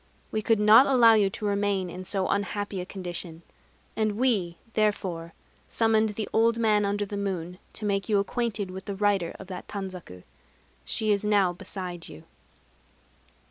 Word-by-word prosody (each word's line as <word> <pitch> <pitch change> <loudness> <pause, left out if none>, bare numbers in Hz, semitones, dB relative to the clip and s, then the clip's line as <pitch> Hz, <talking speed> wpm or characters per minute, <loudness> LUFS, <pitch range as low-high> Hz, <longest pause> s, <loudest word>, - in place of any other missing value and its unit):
We 215 - -1
could 220 0 +2
not 215 +5 +7
allow 240 -4 +6
you 205 -3 +4
to 215 +1 -6
remain 200 -2 0
in 185 +2 -7
so 190 0 -1
unhappy 200 -1 -2
a 180 - -7
condition; 175 -3 -7 0.5
and 215 -1 +1
We 205 -9 +1 0.2
therefore 185 -6 -1 0.3
summoned 220 -2 +2
the 215 -1 -3
Old 230 +1 +3
Man 215 -3 +3
under 205 +1 -1
the 205 - -6
Moon 180 -3 -4
to 215 - -4
make 195 -1 -1
you 210 - +3
acquainted 205 -1 -1
with 190 +1 -8
the 200 - -4
writer 195 -4 +1
of 195 - -8
that 180 -1 -7
tanzaku. 185 - -7 0.6
She 215 -1 0
is 200 0 +1
now 200 -4 +3
beside 180 -1 -6
you." 80 - -12
200 Hz, 165 wpm, -27 LUFS, 185-215 Hz, 0.6 s, not